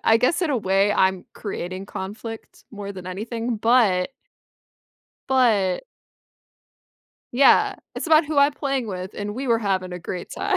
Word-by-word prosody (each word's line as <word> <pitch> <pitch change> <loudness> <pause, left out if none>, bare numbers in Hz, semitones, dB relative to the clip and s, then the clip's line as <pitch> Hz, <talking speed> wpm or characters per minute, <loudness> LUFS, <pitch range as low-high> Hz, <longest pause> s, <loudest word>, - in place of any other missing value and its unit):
I 225 - +6
guess 335 +9 +2
in 320 - +1
a 270 - +1
way 195 0 +2
I'm 190 -2 +2
creating 190 -2 -5
conflict 215 +4 -8
more 205 -2 -7
than 185 -1 -9
anything, 225 +5 -3
but 215 -4 +3 1.2
But 220 -8 +3 1.5
Yeah, 270 +3 +5 0.2
it's - - -4
about 315 0 +5
who 295 -1 -1
I'm 280 +1 +5
playing 275 -4 -2
with, 185 -1 -5
and 205 0 -4
we 265 +2 -4
were 230 - +4
having 190 -4 -1
a 180 - -5
great 175 +1 -6
time. 395 -1 0
215 Hz, 155 wpm, -23 LUFS, 190-255 Hz, 1.5 s, I